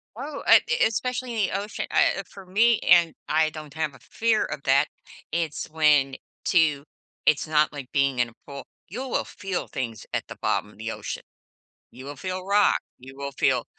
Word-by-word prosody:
Oh, 280 +5 -6
eh - - +8
eh 475 - +4
especially 245 0 -1
in - - -3
ocean, 205 +2 -3
uh, 195 - +2
for 195 - -13
me 220 +5 +3
and 170 -2 +5
I 155 0 +3
don't 155 -2 -9
have 155 -2 -1
a - - -16
fear 225 -1 +1
of - - -5
that. 140 +2 +4 0.4
It's 165 -3 -2
when 150 -4 +3 0.3
to 155 -5 +3 0.4
it's 155 +1 +3
not 150 -1 +3
like 140 -4 -8
being 140 -3 +2
in 120 - +3
a - - -19
pool. 140 -1 -8 0.2
You 250 +9 -5
will - - 0
feel 190 -2 -4
things 115 -4 -5
at - - -2
the - - -8
bottom 105 - 0
of - - -20
the 115 +1 -4
ocean. - - -6 0.7
You 130 +2 -12
will 145 - -7
feel 185 +1 -5
rock, 205 +1 +4 0.2
you 130 +2 -12
will 140 0 -5
feel - - +1
155 Hz, 190 wpm, -25 LUFS, 140-200 Hz, 0.7 s, eh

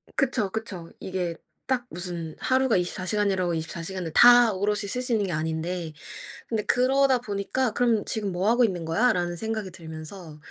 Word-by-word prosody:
그쵸, 255 -7 +1
그쵸. 190 -6 -6
이게 180 -3 -3 0.3
딱 255 -2 0
무슨 175 -3 -5
하루가 260 -2 +2
24 180 +1 -3
시간이라고 190 -4 +1
24 165 +1 -5
시간을 180 -1 -4
다 245 -1 +8
오롯이 205 +2 0
쓸 250 +5 -2
수 250 -2 -1
있는 205 -3 +1
게 - - -3
아닌데, 160 +1 -3 0.6
근데 220 -3 -1
그러다 265 +1 +3
보니까 220 +3 -1
'그럼 230 -3 +2
지금 205 -4 -2
뭐 180 +3 0
하고 240 +1 +4
있는 180 -6 -1
거야?'라는 175 -1 +1
생각이 220 0 -3
들면서 160 -1 -10
195 Hz, 335 characters per minute, -26 LUFS, 175-235 Hz, 0.6 s, 다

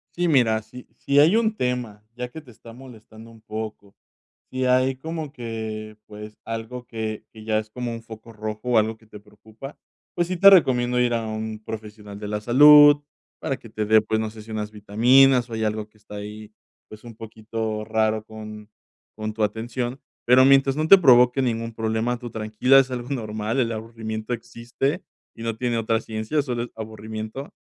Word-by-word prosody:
Sí, 175 0 0
mira, 120 -8 +3
si, 125 +3 -13
si 140 +1 +2
hay 160 +8 +5
un 225 -1 +1
tema, 125 - -3
ya 125 0 -5
que 160 +5 -10
te 135 - -19
está 115 +1 -14
molestando 115 -3 -14
un 115 -1 -17
poco, 110 -2 -7 0.5
si 130 0 -2
hay 130 +1 +2
como 160 +2 -6
que, 110 -4 -6
pues, 105 0 -10
algo 115 +2 -6
que 110 -1 -5
que 110 - -13
ya 110 -1 +1
es 110 0 -8
como 120 +1 -5
un 115 - -7
foco 115 0 -12
rojo, 110 0 -5
o 120 - +3
algo 110 +1 -1
que 110 - -23
te 105 -1 -13
preocupa, 110 +6 -13 0.4
pues 175 - 0
sí 185 - -2
te 195 +2 +9
recomiendo 125 -9 +4
ir 120 -1 +2
a 115 - 0
un 110 0 -5
profesional 105 -2 -9
de 105 - -6
la 105 0 -3
salud 145 +5 +7 0.4
para 135 - -3
que 115 - -14
te 110 0 -3
dé, 110 +1 +5
pues, 110 0 -1
no 110 -1 -3
sé 110 0 -11
si 110 - -15
unas 105 -1 -4
vitaminas, 120 +5 +4
o - - -8
hay 110 0 -2
algo 110 0 -2
que 110 0 -28
está 105 0 -12
ahí, 105 +1 -8 0.4
pues, 110 0 -13
un 120 -2 -11
poquito 110 -1 -5
raro 110 -1 0
con 110 -1 -10 0.5
con 110 0 -5
tu 110 0 -2
atención, 120 +4 -3 0.3
pero 125 +2 +6
mientras 135 0 +4
no 155 +1 0
te 195 - +9
provoque 125 -4 +5
ningún 115 -2 -2
problema, 110 +2 -1
tú 120 0 -8
tranquila, 110 +5 +3
es 135 -1 +1
algo 125 -1 -5
normal, 110 -2 -3
el 120 -3 +1
aburrimiento 110 0 -6
existe 120 - -4 0.3
y 115 - -9
no 115 -1 -3
tiene 120 -1 -1
otra 115 0 0
ciencia, 110 +7 -2
solo 125 -4 -3
es 120 - -8
aburrimiento, 110 +4 -7
115 Hz, 195 wpm, -23 LUFS, 110-125 Hz, 0.5 s, te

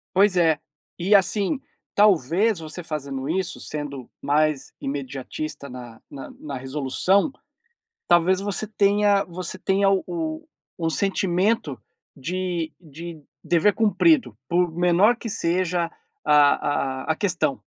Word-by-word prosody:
Pois 195 -1 +4
é, 160 -3 +3 0.4
e 195 +4 +4
assim, 205 +7 +2 0.4
talvez 200 - +3
você 160 +2 -7
fazendo 140 -4 -4
isso, 185 +2 -2
sendo 140 -4 -6
mais 150 -1 +1
imediatista 140 +1 -5
na 120 -2 -10
na 135 - -8
na 145 -3 -6
resolução, 150 - +1 0.8
talvez 175 +2 +4
você 200 +1 -3
tenha 205 -1 +3
você 180 +1 -6
tenha 195 +1 +2
o 315 - -2 0.3
o 165 -1 0
sentimento 190 - 0 0.4
de 170 +2 -3
de 165 0 -9 0.2
dever 175 +5 +3
cumprido, 170 - +3
por 175 0 +2
menor 180 +7 +4
que 235 - -6
seja 175 -4 0 0.3
a 145 -2 +3
a 160 - +1
a - - -6
questão. 165 - 0
170 Hz, 120 wpm, -24 LUFS, 150-195 Hz, 0.8 s, Pois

